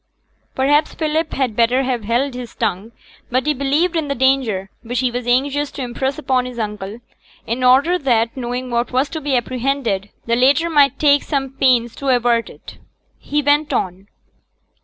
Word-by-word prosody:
Perhaps 290 Hz, +3 st, +2 dB
Philip 315 Hz, 0 st, -1 dB
had 255 Hz, -5 st, -1 dB
better 240 Hz, +3 st, +3 dB
have 250 Hz, -4 st, -2 dB
held 245 Hz, +5 st, 0 dB
his 245 Hz, -1 st, -8 dB
tongue; 200 Hz, +6 st, -2 dB, 0.4 s
but 255 Hz, +2 st, 0 dB
he 300 Hz, -, +2 dB
believed 295 Hz, +6 st, 0 dB
in 320 Hz, -3 st, 0 dB
the 280 Hz, -, -2 dB
danger, 245 Hz, -8 st, +1 dB
which 245 Hz, +1 st, -2 dB
he 255 Hz, -1 st, +1 dB
was 245 Hz, 0 st, -4 dB
anxious 280 Hz, +4 st, +1 dB
to 270 Hz, -, -5 dB
impress 265 Hz, +3 st, -3 dB
upon 260 Hz, -4 st, 0 dB
his 250 Hz, -1 st, -9 dB
uncle, 210 Hz, 0 st, -5 dB, 0.4 s
in 240 Hz, +3 st, -2 dB
order 280 Hz, +8 st, +4 dB
that, 230 Hz, -5 st, +1 dB
knowing 250 Hz, 0 st, -4 dB
what 235 Hz, +1 st, -1 dB
was 260 Hz, +3 st, +1 dB
to 315 Hz, -, -5 dB
be 280 Hz, -2 st, 0 dB
apprehended, 240 Hz, -5 st, -2 dB, 0.2 s
the 235 Hz, -, +1 dB
latter 285 Hz, +7 st, +3 dB
might 280 Hz, -3 st, +4 dB
take 290 Hz, -1 st, +4 dB
some 270 Hz, -3 st, -2 dB
pains 250 Hz, -4 st, +2 dB
to 275 Hz, -, -5 dB
avert 240 Hz, -2 st, +2 dB
it. -, -, -13 dB, 0.4 s
He 295 Hz, 0 st, -1 dB
went 290 Hz, +1 st, +2 dB
on. 185 Hz, +1 st, -2 dB
255 Hz, 180 wpm, -19 LUFS, 235-280 Hz, 0.4 s, order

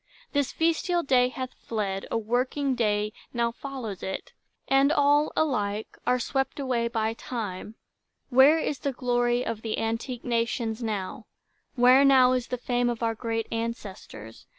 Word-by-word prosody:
This 285 Hz, -2 st, 0 dB
festal 335 Hz, +2 st, +1 dB
day 250 Hz, -2 st, +3 dB
Hath 255 Hz, +1 st, -6 dB
fled; 200 Hz, -4 st, -4 dB
a -, -, 0 dB
working 255 Hz, +5 st, 0 dB
day 210 Hz, -3 st, 0 dB, 0.2 s
now 235 Hz, -1 st, +1 dB
follows 235 Hz, -6 st, -6 dB
it, 190 Hz, -, -5 dB, 0.3 s
And 275 Hz, +1 st, +4 dB
all, 290 Hz, 0 st, +3 dB
alike, 215 Hz, -8 st, -1 dB
are 250 Hz, -, +4 dB
swept 270 Hz, +3 st, -2 dB
away 250 Hz, -4 st, 0 dB
by 225 Hz, -1 st, -1 dB
Time. 220 Hz, -3 st, -6 dB, 0.6 s
Where 270 Hz, +5 st, +7 dB
is 295 Hz, -4 st, -2 dB
the 275 Hz, +1 st, -2 dB
glory 245 Hz, -1 st, +1 dB
of 225 Hz, -1 st, -3 dB
the 220 Hz, -1 st, -3 dB
antique 230 Hz, +2 st, -3 dB
nations 230 Hz, -1 st, -1 dB
now? 210 Hz, -5 st, -4 dB, 0.5 s
Where 255 Hz, +2 st, +6 dB
now 260 Hz, -2 st, +6 dB
the 250 Hz, 0 st, -2 dB
fame 245 Hz, 0 st, 0 dB
of 235 Hz, -1 st, -3 dB
our 225 Hz, 0 st, +1 dB
great 225 Hz, 0 st, -2 dB
ancestors? 200 Hz, -, -6 dB
240 Hz, 150 wpm, -27 LUFS, 225-265 Hz, 0.6 s, Where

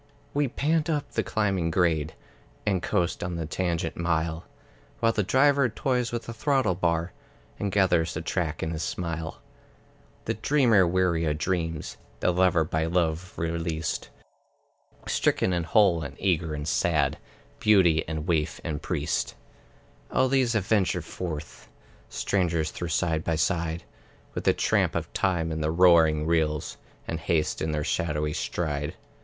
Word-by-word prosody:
We 145 Hz, 0 st, +2 dB
pant 155 Hz, +5 st, 0 dB
up 150 Hz, -3 st, -1 dB
the -, -, 0 dB
climbing 95 Hz, -6 st, 0 dB
grade, 80 Hz, -3 st, +1 dB, 0.5 s
And 95 Hz, -4 st, +1 dB
coast 85 Hz, -1 st, 0 dB
on 90 Hz, -1 st, -3 dB
the 85 Hz, -1 st, -3 dB
tangent 85 Hz, 0 st, -2 dB
mile, 80 Hz, -1 st, -1 dB, 0.5 s
While 115 Hz, -1 st, +3 dB
the 110 Hz, -, 0 dB
Driver 135 Hz, +5 st, +3 dB
toys 125 Hz, 0 st, -1 dB
with 120 Hz, -1 st, -3 dB
the 115 Hz, -, -7 dB
throttle 135 Hz, -3 st, +1 dB
bar, 85 Hz, -1 st, 0 dB, 0.5 s
And 100 Hz, -1 st, -1 dB
gathers 85 Hz, -6 st, +2 dB
the 80 Hz, -, -2 dB
track 85 Hz, -3 st, -2 dB
in 80 Hz, -, -2 dB
his 80 Hz, -1 st, -3 dB
smile. 80 Hz, -2 st, -4 dB, 0.8 s
The -, -, 0 dB
dreamer 120 Hz, -11 st, +3 dB
weary 85 Hz, -2 st, +1 dB
of 75 Hz, -1 st, 0 dB
dreams, 80 Hz, -2 st, -2 dB, 0.2 s
The -, -, +2 dB
lover 90 Hz, -2 st, +3 dB
by 80 Hz, +1 st, -1 dB
love 85 Hz, +1 st, -1 dB
released, 80 Hz, -1 st, -2 dB, 1.0 s
Stricken 95 Hz, -, +1 dB
and 85 Hz, -2 st, -1 dB
whole, 95 Hz, -6 st, +4 dB
and 70 Hz, -1 st, -6 dB
eager 85 Hz, -5 st, 0 dB
and 75 Hz, 0 st, -5 dB
sad, 75 Hz, -2 st, +1 dB, 0.4 s
Beauty 95 Hz, -, +4 dB
and 80 Hz, -1 st, -3 dB
waif 80 Hz, -3 st, 0 dB
and 75 Hz, -2 st, -3 dB
priest, -, -, -2 dB, 0.8 s
All 130 Hz, -, +3 dB
these 130 Hz, -3 st, +2 dB
adventure 105 Hz, -2 st, +1 dB
forth, 80 Hz, -4 st, -6 dB, 0.4 s
Strangers 85 Hz, -5 st, 0 dB
though 85 Hz, -, -5 dB
side 80 Hz, -1 st, 0 dB
by 80 Hz, -, 0 dB
side, 80 Hz, +1 st, 0 dB, 0.5 s
With -, -, -5 dB
the -, -, +5 dB
tramp -, -, +1 dB
of -, -, -3 dB
time 85 Hz, -4 st, 0 dB
in 80 Hz, 0 st, -3 dB
the 75 Hz, -, 0 dB
roaring 80 Hz, -3 st, +5 dB
wheels, 80 Hz, -2 st, 0 dB, 0.3 s
And 85 Hz, -, -3 dB
haste 80 Hz, -2 st, 0 dB
in 80 Hz, -, -1 dB
their 75 Hz, -1 st, -1 dB
shadowy 75 Hz, -1 st, -1 dB
stride. 75 Hz, -4 st, -2 dB
85 Hz, 150 wpm, -27 LUFS, 80-95 Hz, 1.0 s, the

